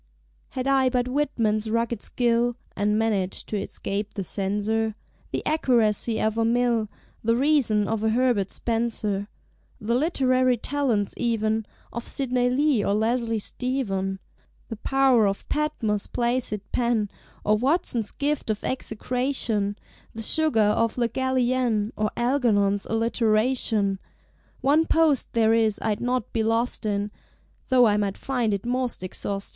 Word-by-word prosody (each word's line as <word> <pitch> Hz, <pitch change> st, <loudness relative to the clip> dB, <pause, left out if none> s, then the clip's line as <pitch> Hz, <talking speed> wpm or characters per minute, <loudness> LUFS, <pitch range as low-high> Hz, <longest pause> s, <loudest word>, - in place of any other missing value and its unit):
Had 255 Hz, -, -1 dB
I 270 Hz, -1 st, +3 dB
but 250 Hz, -1 st, 0 dB
Whitman's 230 Hz, -6 st, 0 dB
rugged 230 Hz, -1 st, -1 dB
skill, 240 Hz, 0 st, +1 dB, 0.2 s
(And 210 Hz, +1 st, +1 dB
managed 205 Hz, -4 st, -1 dB
to 210 Hz, -2 st, -1 dB
escape 205 Hz, +2 st, -4 dB
the 195 Hz, -, -2 dB
Censor), 210 Hz, +4 st, -1 dB, 0.4 s
The -, -, -3 dB
Accuracy 235 Hz, -6 st, +2 dB
of 220 Hz, +1 st, 0 dB
a -, -, +3 dB
Mill, 235 Hz, -2 st, +1 dB, 0.3 s
The 230 Hz, +1 st, +2 dB
Reason 250 Hz, -6 st, +2 dB
of 220 Hz, -1 st, -2 dB
a 220 Hz, -, +2 dB
Herbert 230 Hz, -4 st, +1 dB
Spencer, 220 Hz, -4 st, -2 dB, 0.5 s
The 220 Hz, +3 st, -1 dB
literary 255 Hz, -3 st, +2 dB
talents 240 Hz, -6 st, 0 dB
even 220 Hz, -2 st, 0 dB, 0.3 s
Of 235 Hz, -, -5 dB
Sidney 250 Hz, -2 st, 0 dB
Lee 270 Hz, -3 st, +2 dB
or 200 Hz, -, +1 dB
Leslie 230 Hz, +1 st, 0 dB
Stephen. 200 Hz, -5 st, -2 dB, 0.5 s
The 225 Hz, -, -5 dB
pow'r 260 Hz, -2 st, +3 dB
of 195 Hz, 0 st, -3 dB
Patmore's 230 Hz, -9 st, -1 dB
placid 235 Hz, -3 st, -1 dB
pen, 235 Hz, -3 st, +1 dB, 0.4 s
Or 215 Hz, -, +4 dB
Watson's 245 Hz, -, 0 dB
gift 290 Hz, -3 st, -2 dB
of 215 Hz, -1 st, -2 dB
execration, 235 Hz, -4 st, -2 dB, 0.4 s
The 225 Hz, -, -5 dB
sugar 310 Hz, -1 st, +3 dB
of 220 Hz, +3 st, +2 dB
Le 235 Hz, -1 st, +1 dB
Gallienne, 250 Hz, -4 st, 0 dB
Or 215 Hz, 0 st, 0 dB
Algernon's 225 Hz, -6 st, +2 dB
Alliteration. 225 Hz, -2 st, +1 dB, 0.6 s
One 295 Hz, +5 st, +3 dB
post 315 Hz, -5 st, +2 dB
there 225 Hz, -1 st, +3 dB
is 220 Hz, -2 st, +2 dB
I'd 210 Hz, -2 st, -1 dB
not 250 Hz, -2 st, -1 dB
be 225 Hz, -, +1 dB
lost 225 Hz, 0 st, 0 dB
in, 205 Hz, 0 st, -1 dB, 0.6 s
Tho' 255 Hz, -2 st, +5 dB
I 210 Hz, -2 st, +3 dB
might 200 Hz, -2 st, -1 dB
find 245 Hz, -5 st, -1 dB
it 200 Hz, +1 st, -2 dB
most 250 Hz, -4 st, -1 dB
ex 185 Hz, -, -4 dB
austin'! 200 Hz, 0 st, -2 dB
230 Hz, 140 wpm, -25 LUFS, 210-255 Hz, 0.6 s, Tho